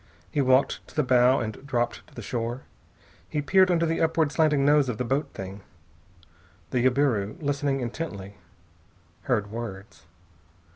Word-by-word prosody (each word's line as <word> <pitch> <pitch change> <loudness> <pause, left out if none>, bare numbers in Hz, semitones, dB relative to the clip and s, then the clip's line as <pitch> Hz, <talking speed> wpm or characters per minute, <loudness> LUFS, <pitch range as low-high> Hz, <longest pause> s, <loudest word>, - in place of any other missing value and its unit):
He 145 - +1
walked 130 +1 +2
to - - -17
the 150 - +2
bow 125 +1 +4
and 110 +2 -5
dropped 120 -4 -2
to - - -21
the 120 - -7
shore. 120 +3 -3 0.7
He 150 - -2
peered 185 +6 +4
under 170 -2 +2
the 165 0 -1
upward 160 -2 +2
slanting 150 -4 +2
nose 145 -2 +4
of 115 - -3
the 125 - -2
boat 135 +5 -1
thing. 95 +1 -7 1.1
The 125 -2 +1
jabiru, 125 -6 +1
listening 140 -2 -1
intently, 105 -6 -5 0.9
heard 105 -6 0
words. 105 -6 -8
130 Hz, 150 wpm, -26 LUFS, 115-145 Hz, 1.1 s, bow